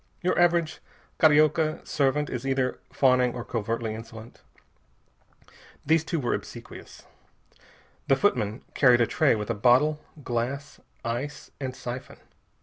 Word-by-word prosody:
Your 180 - +1
average 170 -2 +2 0.4
Carioca 155 0 +3
servant 145 +1 +1
is 125 -1 -5
either 135 -1 -1
fawning 125 -2 +3
or 120 - -6
covertly 115 0 -3
insolent. 115 +1 -11 1.4
These 160 +1 +3
two 165 0 -2
were 125 - -1
obsequious. - - -8 1.0
The 135 - +5
footman 120 - 0
carried 125 -3 +5
a - - +5
tray 145 +1 +2
with 105 +1 -3
a - - +1
bottle, 130 +8 +3 0.2
glass, 130 +4 -3 0.3
ice, 125 +6 -4
and 130 -2 -4
siphon. 125 +1 -7
130 Hz, 125 wpm, -26 LUFS, 120-150 Hz, 1.4 s, The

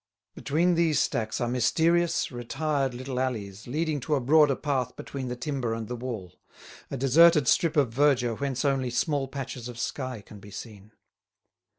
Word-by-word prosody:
Between 170 +5 +1
these 165 -3 +2
stacks 110 -1 0
are 120 - 0
mysterious, 160 +9 +2
retired 135 +2 -2
little 130 0 -4
alleys 110 -6 -3
leading 155 +3 -1
to 150 +3 0
a - - +1
broader 145 +2 +4
path 130 -4 -2
between 135 -2 -6
the 125 - -3
timber 125 -3 -2
and 115 -1 -5
the 125 - -4
wall, 115 -8 -7 0.5
a 140 - -4
deserted 150 +5 +5
strip 165 -2 +3
of 130 -6 +2
verdure 130 -3 +3
whence 135 +2 -2
only 135 -2 +1
small 135 +3 0
patches 130 -3 -6
of 120 - -9
sky 130 -2 -4
can 105 +1 -13
be 105 - -13
seen. 105 0 -10
130 Hz, 170 wpm, -27 LUFS, 120-150 Hz, 0.5 s, deserted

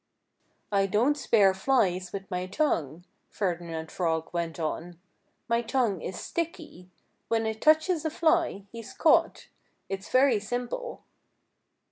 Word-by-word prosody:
"I 195 -1 +2
don't 235 +9 +2
spear 205 -9 +4
flies 190 -5 +1
with 195 -1 -5
my 180 0 -2
tongue," 175 - -1 0.2
Ferdinand 170 -4 -3
Frog 165 -2 -1
went 170 -1 -3
on. 165 +2 -4 0.5
"My 235 0 +2
tongue 235 - 0
is 185 - -5
sticky. 320 - -5 0.4
When 225 -1 +1
it 220 0 -3
touches 315 +2 +3
a 315 - 0
fly, 320 - +1
he's 230 -1 -9
caught. - - +3 0.4
It's 195 0 -5
very 255 -3 +4
simple." 245 - -4
205 Hz, 125 wpm, -28 LUFS, 180-270 Hz, 0.5 s, spear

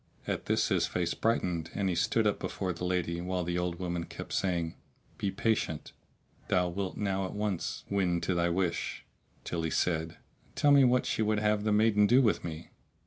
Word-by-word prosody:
At - - -3
this - - +2
his - - +2
face 85 -1 -1
brightened 90 -8 0
and 100 - 0
he 95 - +1
stood 100 +6 +1
up 105 - +1
before 95 -2 -3
the 90 +1 -5
lady 85 -2 -1
while 90 0 -2
the 90 +1 -1
old 90 -1 -2
woman 85 -2 -3
kept - - -8
saying, 85 -4 0 0.5
"Be 100 - 0
patient; 95 -5 -1 0.6
thou 90 -1 +2
wilt 95 +1 -4
now 95 -2 0
at - - -8
once 105 -4 -2
win 90 -4 +1
to 95 - 0
thy 85 0 +1
wish!"; 85 -1 -1 0.4
till 85 - -3
he 80 - -1
said, 80 -1 0 0.4
"Tell 145 - +4
me 140 -1 +7
what 125 0 +3
she - - -1
would 110 0 +2
have 105 0 +1
the 105 - +2
maiden 105 -1 +4
do 120 +5 +6
with 120 -6 +2
me?" 80 -2 -7
90 Hz, 195 wpm, -30 LUFS, 85-105 Hz, 0.6 s, me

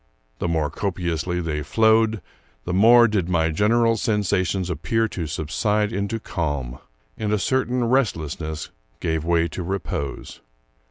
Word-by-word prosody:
The - - -1
more 80 -2 0
copiously 90 -2 -2
they 75 -3 -2
flowed, 110 +4 +3 0.4
the 90 - -2
more 115 +5 +7
did 100 -5 -1
my 80 -2 +2
general 115 +6 +2
sensations 95 -4 0
appear 90 +7 0
to 85 -6 -4
subside 105 +8 -1
into 100 +2 -2
calm, 70 - -3 0.4
and 105 -1 -1
a 105 - +3
certain 125 +2 0
restlessness 80 - -1 0.3
give 80 -3 -1
way 85 0 +2
to 90 - -5
repose. 85 -6 -4
90 Hz, 130 wpm, -23 LUFS, 80-110 Hz, 0.4 s, more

